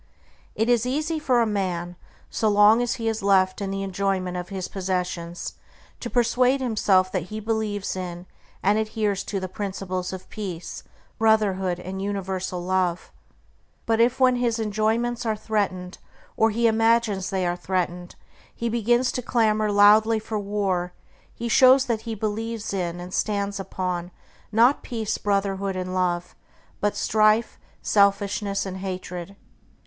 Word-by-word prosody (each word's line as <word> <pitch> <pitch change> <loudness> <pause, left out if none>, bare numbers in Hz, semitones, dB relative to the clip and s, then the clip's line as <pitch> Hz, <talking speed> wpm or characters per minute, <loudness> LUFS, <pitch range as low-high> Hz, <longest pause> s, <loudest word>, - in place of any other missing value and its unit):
It 220 - 0
is 240 0 +2
easy 305 +4 -1
for 255 -5 +2
a - - +3
man, 180 -4 -2 0.3
so 220 - 0
long 210 +3 +6
as 245 +1 0
he 230 -3 -4
is 225 0 -1
left 190 0 +3
in 195 - -2
the 195 0 -3
enjoyment 190 -1 -1
of 180 0 -5
his 190 -2 -4
possessions, 180 -2 -3 0.5
to 240 - -5
persuade 250 +2 +2
himself 205 -7 +2
that 180 -4 -2
he 215 - -5
believes 215 -3 -2
in 180 -1 -6 0.4
and 205 +3 +3
adheres 215 -2 -1
to 200 - -2
the 185 - -4
principles 185 -2 -4
of 190 -1 -8
Peace, 180 -5 -6 0.4
Brotherhood, 195 -5 +2
and 190 +2 -6
Universal 190 -2 -3
Love; 180 -1 -1 0.7
but 225 0 +2
if, 245 +3 +2
when 255 -1 +4
his 240 -2 0
enjoyments 225 +3 0
are 220 -2 0
threatened, 195 -4 -2 0.4
or 225 - +3
he 230 +2 0
imagines 225 -3 +2
they 190 -2 -1
are 175 0 0
threatened, 180 -1 -3 0.4
he 235 - -2
begins 240 +3 +2
to 250 - -3
clamor 215 -3 +1
loudly 210 +2 +6
for 220 0 -3
war, 195 -3 -1 0.4
he 235 - -5
shows 260 +3 +6
that 230 -4 -1
he 225 - -2
believes 220 +1 -3
in 175 -2 -2
and 180 +1 -8
stands 200 -1 -1
upon, 180 -2 -3 0.4
not 235 +6 +4
Peace, 225 -3 -3
Brotherhood, 195 -1 -1
and 185 0 -4
Love, 180 -1 -1 0.4
but 205 0 0
strife, 215 +2 +2 0.2
selfishness, 200 0 +2
and 190 -1 -5
hatred. 185 -1 -6
205 Hz, 150 wpm, -24 LUFS, 185-225 Hz, 0.7 s, long